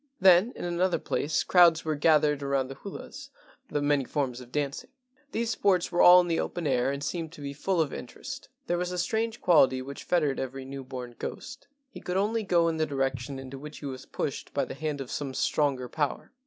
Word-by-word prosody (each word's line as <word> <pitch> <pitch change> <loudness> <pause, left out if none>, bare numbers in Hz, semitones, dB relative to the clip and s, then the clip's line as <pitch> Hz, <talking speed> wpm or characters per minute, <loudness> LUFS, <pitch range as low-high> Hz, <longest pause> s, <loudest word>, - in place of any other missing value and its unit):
Then 190 +4 +6
in - - -5
another 175 +1 +1
place 150 +1 -1
crowds 170 -3 +5
were 155 - 0
gathered 150 -1 +3
around 140 -2 0
the 135 - -7
hulas 275 +7 -9 0.4
(the 145 - -1
many 145 -1 +2
forms 130 -2 -2
of 125 -1 -13
dancing). 140 -1 -3 0.4
These 230 -1 -1
sports 185 -6 +2
were 175 - +2
all 180 +1 +10
in 175 - -3
the 165 -1 0
open 175 - -3
air 130 -1 +2
and 140 0 -4
seemed 165 0 -3
to 150 - -11
be 140 0 -5
full 180 +5 -1
of 155 -4 +1
interest. - - -8 0.2
There 175 0 0
was 180 0 -2
a 180 - -3
strange 225 +5 -1
quality 135 -7 +5
which 140 +2 -7
fettered 150 -6 +1
every 130 0 -5
new 135 0 -7
born 125 -2 -7
ghost: 255 - -7 0.2
he 260 - -11
could 180 +1 -2
only 215 +3 +1
go 175 -5 +2
in 165 -1 0
the 155 0 +1
direction 135 -1 -2
into 135 0 -8
which 150 +1 -9
he - - -9
was 130 -2 -6
pushed - - -4
by - - +1
the - - -7
hand 150 -1 -3
of 130 - -7
some 135 -3 -4
stronger 135 -2 +1
power. 145 +2 -2
150 Hz, 220 wpm, -28 LUFS, 135-175 Hz, 0.4 s, all